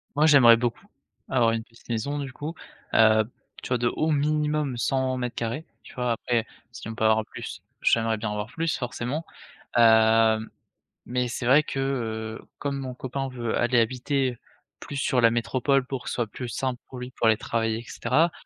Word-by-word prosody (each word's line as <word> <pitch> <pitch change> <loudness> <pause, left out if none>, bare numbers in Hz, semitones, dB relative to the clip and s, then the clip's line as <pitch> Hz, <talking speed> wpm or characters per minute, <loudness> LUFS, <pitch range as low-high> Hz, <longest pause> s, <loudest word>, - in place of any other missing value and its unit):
Moi 150 +2 +4
j'aimerais 130 -7 +8
beaucoup 120 - -3 0.4
avoir 120 -3 +3
une 115 0 -2
petite 115 +1 -22
maison 120 +6 -2
du 140 -2 -5
coup, 150 +5 -6 0.4
heu, 110 -1 +6 0.4
tu - - -7
vois, 125 - +2
de 120 0 +1
au 160 +1 0
minimum 150 -2 0
100m2, 130 +1 -1 0.2
tu - - -14
vois? 125 -2 0
Après 115 0 -1 0.3
si 120 - -9
on 115 - -6
peut 110 - -3
avoir 110 0 +3
plus, - - -8 0.2
j'aimerais 115 -1 +2
bien 105 -1 -3
avoir 105 0 -3
plus. 160 +4 -2
Forcément, 125 +5 -3 0.5
heu, 110 -1 +6 0.7
mais 125 0 -1
c'est 120 +1 -4
vrai 135 +5 +6
que, 135 - -4
heu, 110 -5 -3 0.2
comme 140 -1 -2
mon 130 -2 -5
copain 135 +2 -4
veut 120 -3 -2
aller 120 0 +3
habiter 125 +2 0 0.4
plus 145 - -8
sur 130 -2 +1
la 115 -1 +5
métropole, 130 +3 +1
pour 130 -2 -5
que - - -5
ce - - -3
soit 120 -2 -1
plus 125 +4 -7
simple 125 +1 -2
pour 130 - -9
lui, 125 +1 -7
pour 115 - 0
aller 110 - +6
travailler 115 0 -1
et - - -9
cetera, 145 +8 +1
125 Hz, 190 wpm, -26 LUFS, 115-135 Hz, 0.7 s, j'aimerais